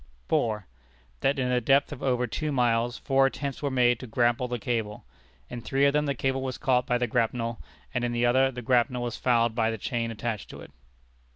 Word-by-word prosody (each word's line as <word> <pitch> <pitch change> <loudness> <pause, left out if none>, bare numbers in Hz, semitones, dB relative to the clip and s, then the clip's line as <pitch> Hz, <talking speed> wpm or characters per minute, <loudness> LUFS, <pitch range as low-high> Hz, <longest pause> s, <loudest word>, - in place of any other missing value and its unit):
4. 105 -3 0 0.5
That 140 +1 +1
in 125 -1 0
a 125 -1 +2
depth 140 +5 +3
of 145 - -7
over 125 -2 +1
two 150 +5 -3
miles 120 -2 +1
four 135 0 +3
attempts 140 0 -5
were 145 - 0
made 120 -2 +3
to 130 - -8
grapple 120 +2 +1
the 120 0 -3
cable. 110 - -3 0.4
In 120 - -7
three 135 +4 +1
of 140 - +3
them 150 0 +1
the 140 - 0
cable 135 +1 -1
was 130 -1 -4
caught 125 -3 +1
by 125 - +2
the 125 - 0
grapnel, 115 +1 -1 0.3
and 125 -2 -1
in 120 - 0
the 120 0 +1
other 130 +2 +4
the 125 -1 -7
grapnel 125 0 +2
was 120 -2 -4
fouled 120 -2 +2
by 110 -1 +1
the 110 - -3
chain 115 +2 -2
attached 115 -1 -4
to - - -10
it. - - -12
125 Hz, 220 wpm, -27 LUFS, 115-135 Hz, 0.5 s, other